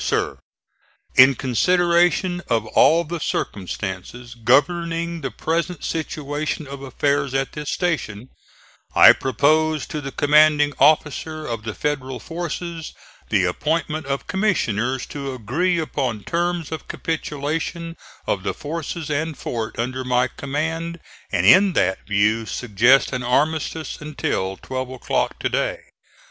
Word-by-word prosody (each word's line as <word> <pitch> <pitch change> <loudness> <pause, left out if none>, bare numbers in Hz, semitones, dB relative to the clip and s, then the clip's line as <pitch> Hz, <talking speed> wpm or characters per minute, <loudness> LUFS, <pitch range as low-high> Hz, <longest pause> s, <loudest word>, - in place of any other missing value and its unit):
SIR: - - -1 0.8
In 135 +1 +8
consideration 175 - +2
of 115 -1 +1
all 160 +9 +4
the 170 +1 -5
circumstances 105 - -4
governing 165 +8 +1
the 135 - -2
present 165 +7 -2
situation 150 -1 -3
of 140 0 -8
affairs 140 +1 0
at 135 0 0
this 150 -1 -6
station, 130 - -2 0.7
I - - +9
propose 155 +4 +1
to 150 - -5
the 135 -1 -6
Commanding 150 0 +4
Officer 155 +1 +2
of 115 -3 -5
the 110 - -4
Federal 135 -4 -2
forces 170 +2 -5 0.3
the 100 -4 +3
appointment 155 - -1
of 140 0 -2
Commissioners 130 - 0
to 140 -2 -5
agree 160 - 0
upon 130 -9 -2
terms 170 - -1
of 160 - -6
capitulation 160 +2 -3 0.3
of 95 - -1
the - - -3
forces 160 +1 -5
and 155 0 -2
fort 115 -2 -4
under 130 +2 -2
my 125 0 +1
command, 160 +5 -3 0.3
and - - +1
in 190 0 +7
that 95 - 0
view 105 +2 +2
suggest 120 +6 +3
an 125 - -1
armistice 155 +5 -1
until 95 -10 -2
12 130 -1 -5
o'clock 130 -1 -2
to - - -1
day. - - -1
145 Hz, 130 wpm, -22 LUFS, 125-165 Hz, 0.8 s, I